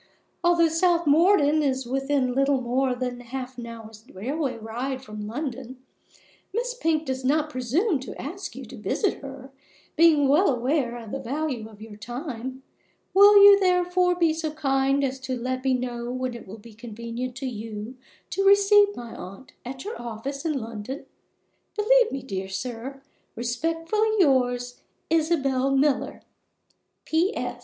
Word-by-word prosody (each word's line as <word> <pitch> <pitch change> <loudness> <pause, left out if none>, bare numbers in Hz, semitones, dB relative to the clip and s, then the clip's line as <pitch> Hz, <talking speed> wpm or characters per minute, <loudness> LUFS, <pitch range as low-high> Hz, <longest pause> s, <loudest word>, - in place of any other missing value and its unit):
Although 340 -1 +4
South 340 +1 +2
Morden 310 0 +4
is 265 -3 0
within 270 0 0
little 275 +1 +2
more 255 +1 0
than 245 -1 -4
half 255 +1 -7
an 235 - -6
hour's 225 -2 -10
railway 260 - -3
ride 245 +4 -4
from 210 -3 -7
London, 260 0 -5 0.7
Miss 485 +4 -2
Pink 320 -9 0
does 260 -1 -3
not 300 +3 +1
presume 290 - 0
to 260 - -8
ask 355 +7 -6
you - - -8
to - - -11
visit 405 - -1
her, 270 -1 -9 0.4
being 315 -4 +5
well 310 +8 +4
aware 250 -1 0
of 225 -3 -9
the 275 - -3
value 265 -3 -3
of 215 -1 -13
your 215 -2 -11
time. 255 +2 -6 0.5
Will 405 +1 +8
you, 405 0 +9
therefore, 360 -1 +2
be 335 -3 +2
so 320 0 -3
kind 275 -2 +1
as 265 0 -2
to 260 -1 -4
let 255 +2 -3
me 265 -1 +2
know 240 -1 -4
when 255 0 -3
it 235 - -10
will 200 +4 -9
be 225 +1 -14
convenient 235 +2 -6
to 270 0 -5
you 220 -1 -6 0.4
to 390 - 0
receive 405 +1 +5
my 235 -1 -8
aunt 195 +8 -10
at 260 +4 -7
your 430 - -6
office 240 +4 -5
in 320 - +1
London? 230 +4 -7 0.7
Believe 485 +2 +4
me, 270 - -4
dear 190 -6 -5
sir, 245 +7 -6 0.3
respectfully 330 - -1
yours, 245 -7 +2 0.3
ISABEL 275 -5 +2
MILLER. 275 -1 0 0.8
P.S. 320 - -1
265 Hz, 155 wpm, -25 LUFS, 240-320 Hz, 0.8 s, you